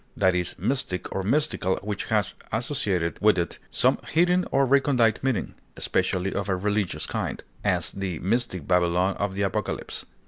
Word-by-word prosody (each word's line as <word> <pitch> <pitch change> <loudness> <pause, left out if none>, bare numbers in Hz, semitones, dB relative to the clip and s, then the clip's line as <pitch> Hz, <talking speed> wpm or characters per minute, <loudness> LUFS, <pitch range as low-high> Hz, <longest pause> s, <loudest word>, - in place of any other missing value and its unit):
That 95 -2 +4
is 90 -1 -1
mystic 130 -9 -1
or 95 - -1
mystical 105 - +1
which 105 -2 -3
has - - +1 0.2
associated 105 - -1
with 105 -1 +5
it 85 -1 -2
some - - +2
hidden 180 +3 +3
or 135 0 +3
recondite 130 -4 +3
meaning, 130 -5 -1 0.2
especially 95 +1 0
of 100 0 -2
a 95 - +2
religious 95 -5 -1
kind; - - -3 0.2
as, - - +1
the 95 -4 -4
mystic 100 - 0
Babylon 90 +1 +2
of 100 -1 -2
the 100 - 0
Apocalypse. 95 - -3
100 Hz, 160 wpm, -25 LUFS, 90-125 Hz, 0.2 s, with